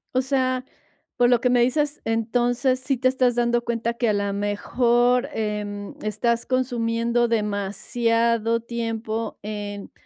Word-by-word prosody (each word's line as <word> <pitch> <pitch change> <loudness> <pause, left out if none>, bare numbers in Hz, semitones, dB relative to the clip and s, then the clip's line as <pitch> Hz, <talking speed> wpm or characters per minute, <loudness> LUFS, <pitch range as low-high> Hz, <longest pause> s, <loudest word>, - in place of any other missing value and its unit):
O 255 - +4
sea, 255 -1 0 0.5
por 245 0 +4
lo 245 -1 +4
que 250 - +1
me 245 -1 +4
dices, 290 +4 +1
entonces, 245 +3 +1
¿sí 265 0 0
te 255 +2 +2
estás 255 -2 +2
dando 240 0 +1
cuenta 235 0 -1
que 235 -1 0
a - - +2
la 200 -1 -1
mejor, 240 +5 +1
em, 210 -2 -3
estás 230 +3 0
consumiendo 240 -2 0
demasiado 230 +2 0
tiempo 225 -1 -4
en 205 -1 -6
235 Hz, 135 wpm, -23 LUFS, 220-245 Hz, 0.5 s, O